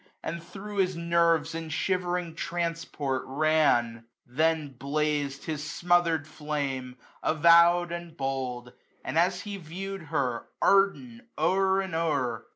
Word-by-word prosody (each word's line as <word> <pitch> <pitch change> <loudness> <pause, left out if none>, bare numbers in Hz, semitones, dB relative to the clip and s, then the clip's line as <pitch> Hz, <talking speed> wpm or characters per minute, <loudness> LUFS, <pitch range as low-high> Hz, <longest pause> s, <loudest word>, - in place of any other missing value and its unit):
And 170 - -4
thro' 195 +4 -9
his 185 -1 +2
nerves 170 -1 +2
in 165 -1 -5
shivering 180 +1 -1
transport 165 -5 -2
ran? 135 -6 +2 0.2
Then 155 +3 0
blaz'd 140 +1 -1
his 155 -2 -3
smotherM 170 -1 +1
flame, 140 -5 -4 0.3
avowM, 170 +2 +5
and 170 -1 -7
bold 130 -3 -3
j - - -22 0.3
And 160 - 0
as 180 +1 +2
he 205 -1 -6
viewed 190 +2 -7
her, 120 -4 -1
ardent, 230 +5 +2
o*er 190 +4 +2
and 190 -3 -6
o*er. 140 -8 -1
165 Hz, 125 wpm, -28 LUFS, 145-175 Hz, 0.3 s, avowM